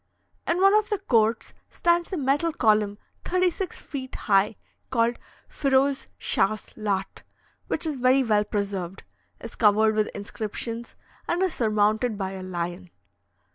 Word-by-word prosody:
In 340 - +1
one 390 +1 +6
of 425 0 +3
the 415 - +1
courts 230 - +1 0.2
stands 345 +1 +1
a 375 - -2
metal 290 +4 +1
column 210 -6 +2 0.3
thirty 365 0 +2
six 375 +1 -5
feet 260 -2 -7
high, 200 0 +2 0.3
called 235 -1 +1 0.3
Feroze 275 0 +1
Schachs 215 +2 0
Laht, 200 -3 -2 0.5
which - - -2
is 305 -3 -2
very 255 +2 +4
well 210 -3 +3
preserved, 200 -3 -3 0.4
is - - -8
covered 215 0 +4
with 215 0 +1
inscriptions, 225 +3 -5 0.3
and 350 +2 +1
is 370 -4 0
surmounted 215 0 +1
by 190 -1 -3
a 190 -1 -7
lion. 175 0 -4
225 Hz, 140 wpm, -25 LUFS, 205-280 Hz, 0.5 s, one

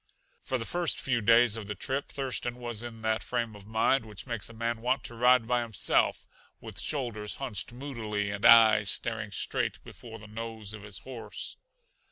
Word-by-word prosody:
For 130 - -2
the 115 - -4
first 175 +2 0
few 120 -3 0
days 115 +1 +5
of 105 -3 -7
the 105 - -4
trip 135 +8 -2
Thurston 130 -3 -2
was 120 -3 -4
in 115 -2 -8
that 110 0 +1
frame 120 -3 -2
of 100 -1 -13
mind 110 +4 +2
which 105 -3 -9
makes 120 -4 -4
a - - -10
man 115 0 -2
want 125 +1 +1
to 120 - -7
ride 125 0 +4
by 125 0 +2
himself, 115 -4 +1 0.3
with 110 -5 -8
shoulders 110 -4 -2
hunched 120 -8 -3
moodily 110 -6 -3
and 100 0 -5
eyes 110 -3 +8
staring - - +1
straight - - -1
before 115 -2 -11
the 110 - -13
nose 110 -1 -6
of 105 - -8
his 100 -2 -5
horse. 125 +3 -6
115 Hz, 190 wpm, -29 LUFS, 105-125 Hz, 0.3 s, eyes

